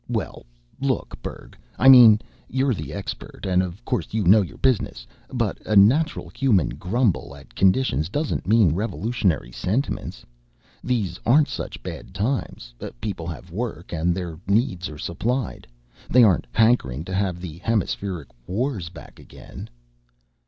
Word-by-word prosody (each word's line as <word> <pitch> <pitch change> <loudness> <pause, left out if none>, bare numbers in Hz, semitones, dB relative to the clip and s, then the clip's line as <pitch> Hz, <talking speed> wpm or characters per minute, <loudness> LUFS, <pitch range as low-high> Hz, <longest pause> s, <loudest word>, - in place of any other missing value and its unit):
Well, - - -4 0.3
look, 135 -1 -2
Berg - - -8 0.2
I 130 - +3
mean, 120 -5 +9 0.3
you're 130 +1 +1
the 75 -8 -6
expert 100 +4 -7
and 90 -1 +3
of 95 +6 -6
course 125 -4 -2
you 110 - +1
know 100 +4 +6
your 80 -8 -6
business, 125 - 0 0.3
but - - -2
a 110 - -1
natural 130 +12 +4
human 120 - +2
grumble 90 - -1
at 70 - -16
conditions 95 - +2
doesn't 145 0 -2
mean 105 -7 +4
revolutionary 100 - -1
sentiments. 110 - -3 0.6
These 105 -8 -1
aren't 145 +6 +4
such - - -6
bad - - -8
times. 100 - -3 0.3
People 85 - -4
have 85 +1 -8
work, 95 -4 -5
and 85 +1 +1
their 85 -4 -5
needs 100 -4 +1
are 75 - -9
supplied. 120 - -3 0.4
They 125 0 +6
aren't 100 -6 +3
hankering 100 - +2
to 95 - -6
have 95 -2 -1
the 85 -2 -8
Hemispheric 95 - -2 0.2
Wars 105 - -2
back - - -13
again." - - -11
100 Hz, 145 wpm, -23 LUFS, 85-120 Hz, 0.6 s, mean